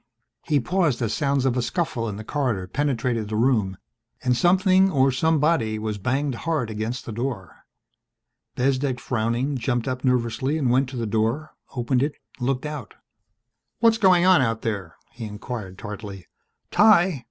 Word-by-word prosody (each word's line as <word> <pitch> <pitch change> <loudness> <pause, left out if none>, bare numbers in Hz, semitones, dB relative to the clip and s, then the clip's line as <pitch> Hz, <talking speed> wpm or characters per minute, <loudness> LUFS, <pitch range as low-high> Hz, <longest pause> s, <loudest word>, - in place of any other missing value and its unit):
He 150 -2 +1
paused 170 -2 +1
as 110 - -1
sounds 140 -2 +1
of 130 -2 +2
a 125 - +1
scuffle 120 -3 -2
in 100 - -5
the 110 - -7
corridor 120 -7 -1
penetrated 120 -2 -1
the 110 - -3
room 110 -5 +1 0.5
and 125 -1 +2
something 185 - +4
or 135 -5 +3
somebody 150 -5 +1
was 110 -1 -3
banged 135 +6 0
hard 145 -3 -2
against 110 +4 -4
the - - -6
door. 115 -5 -5 0.9
Bezdek, 130 0 0
frowning, 120 +4 -1
jumped 120 -1 -1
up 130 0 -3
nervously 125 +3 0
and 135 -6 +1
went 130 +1 +2
to 130 - -7
the 115 - -2
door, 115 +8 -1 0.2
opened 125 +1 +1
it, 145 +2 0 0.3
looked 130 +2 -1
out. 150 -8 -6 0.8
"What's 230 -1 +3
going 185 -4 +5
on 185 -6 +6
out 115 -2 -1
there?" 100 -7 -3 0.2
he 115 -1 -7
inquired 105 -2 -6
tartly. 105 -3 -8 0.5
"_Ty! 190 -7 +5
125 Hz, 160 wpm, -24 LUFS, 115-145 Hz, 0.9 s, on